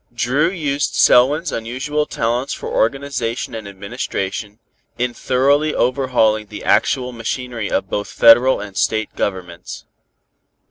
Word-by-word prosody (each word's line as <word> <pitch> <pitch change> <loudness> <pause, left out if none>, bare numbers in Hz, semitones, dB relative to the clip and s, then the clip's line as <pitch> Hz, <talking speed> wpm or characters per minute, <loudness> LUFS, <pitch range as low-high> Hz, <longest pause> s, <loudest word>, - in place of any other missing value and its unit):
Dru 135 +8 +1
used 145 -6 -2
Selwyn's 145 +7 +4
unusual 135 +6 -2
talents 120 +4 -1
for - - -7
organization 125 -1 -1
and 110 -2 -6
administration, 100 +1 -5 0.4
in 120 0 -1
thoroughly 140 +5 +1
overhauling 120 -5 +1
the - - -9
actual 125 -2 +1
machinery 120 -1 -4
of - - -1
both 105 +3 -3
Federal 120 +3 +5
and 100 -1 -8
State 110 +2 -1
Governments. 90 -3 -5
120 Hz, 120 wpm, -19 LUFS, 110-135 Hz, 0.4 s, Federal